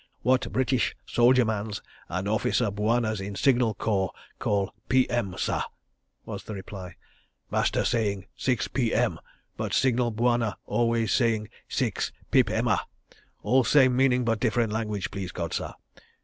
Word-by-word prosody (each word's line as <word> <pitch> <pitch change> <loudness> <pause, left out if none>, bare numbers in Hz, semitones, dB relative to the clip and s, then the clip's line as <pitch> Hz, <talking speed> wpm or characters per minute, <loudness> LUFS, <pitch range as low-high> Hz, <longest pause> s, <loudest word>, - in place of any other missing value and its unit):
"What 130 +1 +2
British 130 -1 +1
soldier 125 +1 +4
mans 105 -1 -2 0.3
and 90 +2 -2
officer 110 +1 +1
bwanas 110 +1 0
in 100 +1 -5
Signal 120 -4 +3
Corps 95 -4 0 0.3
call 100 -1 0 0.2
'p.m.,' 120 -7 +2
sah," - - 0 0.6
was - - -6
the 110 - -6
reply. 95 -2 -8 0.6
"Master - - +1
saying 100 -5 0
'six 125 -2 0
p.m.,' 120 -4 0 0.4
but - - -3
Signal 125 -2 +2
Bwana 120 -1 +1
always 115 -3 +1
saying 115 -4 +1 0.2
'six - - -1 0.2
pip - - +4
emma'—all 130 +1 -1
same 130 -1 +5
meaning 125 -1 +3
but 115 -2 +1
different 115 -2 +1
language, 105 -3 -2
please 95 -2 -5
God, 85 -3 -4
sah. - - -3
115 Hz, 135 wpm, -27 LUFS, 100-125 Hz, 0.6 s, same